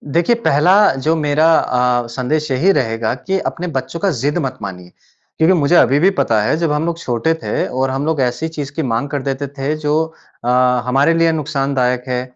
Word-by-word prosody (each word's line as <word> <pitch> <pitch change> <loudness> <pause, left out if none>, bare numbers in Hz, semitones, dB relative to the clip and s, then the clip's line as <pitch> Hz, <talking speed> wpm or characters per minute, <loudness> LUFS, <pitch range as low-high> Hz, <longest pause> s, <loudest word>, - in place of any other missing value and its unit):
देखिए 175 +8 +3
पहला 175 -6 +2 0.2
जो 155 +5 0
मेरा 155 +1 +2
अ, 125 -1 +1
संदेश 145 +5 -2
यही 150 +10 +3
रहेगा 115 - -1
कि 190 +9 -2
अपने 180 -1 -4
बच्चों 165 +5 -5
का 200 - +1
ज़िद 145 +5 0
मत 130 - -5
मानिए। 90 -3 -8 0.5
क्योंकि 165 +3 +4
मुझे 145 +4 +2
अभी 140 -2 +4
भी 185 - +4
पता 110 -2 +2
है 105 - +1
जब 165 -2 0
हम 150 +2 0
लोग 170 -1 -2
छोटे 125 +5 0
थे - - -1
और 130 +1 -1
हम 135 +2 -2
लोग 160 -3 0
ऐसी 125 +5 -1
चीज़ 145 -3 -6
की 160 - -2
माँग 120 +2 -2
कर 145 -1 -3
देते 135 +1 -3
थे 140 +3 -1
जो 150 -1 -1 0.5
अ, - - -4 0.4
हमारे 135 +6 +2
लिए 165 0 +3
नुक़सानदायक 135 -5 -1
है। 125 -1 -1
140 Hz, 205 wpm, -17 LUFS, 125-160 Hz, 0.5 s, क्योंकि